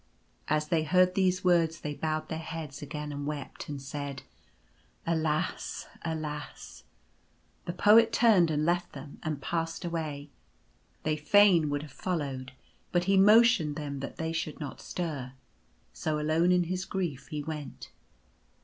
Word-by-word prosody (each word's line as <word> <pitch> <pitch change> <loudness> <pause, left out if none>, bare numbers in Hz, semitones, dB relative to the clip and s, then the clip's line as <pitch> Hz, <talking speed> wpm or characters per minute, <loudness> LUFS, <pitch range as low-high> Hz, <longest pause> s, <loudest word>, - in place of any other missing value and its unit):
As 150 0 0
they 165 -2 +2
heard 180 +4 +4
these 185 -1 +1
words 170 -2 +3
they 150 - -3
bowed 155 +1 -2
their 160 - -4
heads 160 -4 -6
again 150 0 -5
and 145 0 -4
wept, 150 -2 -6
and 145 -1 -4
said: 140 0 -6 0.8
"Alas! 160 0 -1 0.2
alas!" 155 -2 -6 0.8
The 175 - -3
poet 220 +5 +6
turned 205 -8 +5
and 155 -1 0
left 175 +1 0
them; 140 +1 -10
and 155 -2 -3
passed 165 +2 -2
away. 150 -4 -4 0.7
They 155 0 0
fain 170 0 +5
would 145 0 -2
have 150 - -10
followed; 135 -7 -3 0.4
but 175 -1 +2
he 195 +2 +3
motioned 205 -6 +6
them 145 -2 -4
that 140 - -6
they 160 0 -2
should 165 -2 -3
not 145 -3 -6
stir. 145 -8 -4 0.6
So, 155 -1 -2
alone, 160 +4 +2
in 180 0 +4
his 185 +2 -2
grief 165 -8 -3
he 150 -1 -4
went. 150 -2 -7
155 Hz, 150 wpm, -29 LUFS, 150-175 Hz, 0.8 s, poet